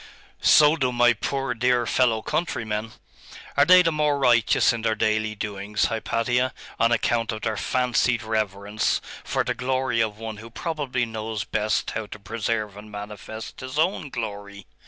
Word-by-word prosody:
'So 150 +1 +6
do 130 -5 0
my 120 0 +4
poor 135 +3 -2
dear 120 0 +2
fellow 115 -3 +2
countrymen. 110 -9 -2 0.6
Are 140 - +5
they 180 +2 +8
the 165 - +2
more 150 -2 +1
righteous 120 -3 +4
in 115 - -4
their 110 -1 +1
daily 110 0 0
doings, 105 0 -2
Hypatia, 120 +3 0 0.2
on 115 +1 +3
account 115 0 +1
of 110 -1 -6
their 110 -1 -1
fancied 125 0 +1
reverence 105 -1 -1 0.2
for - - 0
the - - -1
glory 130 -2 0
of 110 -2 -1
One 110 -1 -6
who 110 +2 -10
probably 135 -2 -2
knows 110 -1 -4
best 105 0 -1
how 110 -1 -4
to - - -9
preserve 110 0 -3
and 105 +1 -11
manifest 105 +1 -8
His 130 +2 -7
own 160 -2 +1
glory? 100 -5 -6
115 Hz, 160 wpm, -24 LUFS, 110-125 Hz, 0.6 s, they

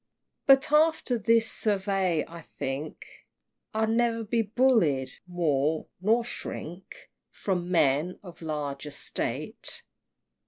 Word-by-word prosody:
But 270 +1 +6
after 305 -4 +3
this 225 +2 +4
survey, 195 -5 +1
I 170 0 -10
think 140 0 -5 0.7
I'll 220 0 +1
ne'er 230 0 +1
be 230 +2 +1
bullied 205 - +2 0.2
more, 160 -3 0 0.2
nor 225 +4 +3
shrink 190 -6 -8 0.2
From 180 -3 -2
men 160 0 +2
of 175 -3 -12
large 150 -3 -4
estate! 145 -1 -4
185 Hz, 105 wpm, -28 LUFS, 155-230 Hz, 0.7 s, But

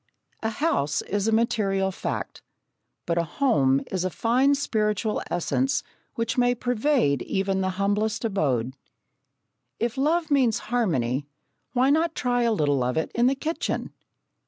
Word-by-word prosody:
A 220 - 0
house 225 - 0
is 205 +1 -1
a - - +2
material 210 -4 +1
fact, - - -5 0.6
but 170 0 0
a - - +2
home 150 - +2
is 185 -2 -1
a 185 - 0
fine 245 - +2
spiritual 215 -5 0
essence 260 +10 0 0.3
which 230 +1 -1
may 245 0 +3
pervade 245 - +1
even 195 0 -1
the 190 - 0
humblest 210 +3 0
abode. 135 - 0 1.1
If 235 +3 -1
love 315 +3 +1
means 255 -6 +3 0.2
harmony, 140 - 0 0.5
why 260 +2 +3
not 325 +2 +1
try 245 -1 0
a 235 -1 +2
little 145 - +1
of 125 +3 -1
it 160 - -1
in 240 +1 +3
the 270 - +2
kitchen? 320 +4 -3
220 Hz, 145 wpm, -25 LUFS, 175-250 Hz, 1.1 s, may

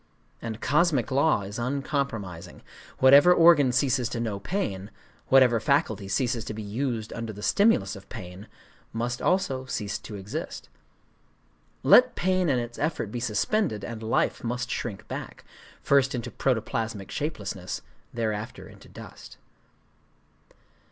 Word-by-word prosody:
And 115 -1 -5
cosmic 150 -3 +2
law 140 -4 +3
is 100 +4 -6
uncompromising. 125 - -3 0.3
Whatever 140 +7 +7
organ 165 -6 +6
ceases 125 -1 +1
to 120 - -4
know 110 -4 -2
pain,—whatever 120 - 0
faculty 115 -7 0
ceases 120 +3 0
to 110 - -5
be 110 - -6
used 110 +1 -3
under 115 -1 -5
the 105 0 -10
stimulus 155 - +3
of 100 0 -13
pain,—must 115 +4 -7
also 160 -9 0
cease 105 -5 -3
to 105 - -9
exist. 100 0 -6 1.1
Let - - +6
pain 185 -1 +1
and 130 -3 +2
its 120 0 -6
effort 150 -9 -2
be 120 - -3
suspended, 115 - 0
and 115 -1 -7
life 110 0 0
must 125 +1 -3
shrink 100 -6 -4
back, - - -7 0.4
first 135 -2 +3
into 120 - -5
protoplasmic 110 -4 -2
shapelessness, 105 - -4 0.3
thereafter 110 0 -4
into - - -16
dust. - - -12
120 Hz, 125 wpm, -26 LUFS, 105-140 Hz, 1.1 s, Whatever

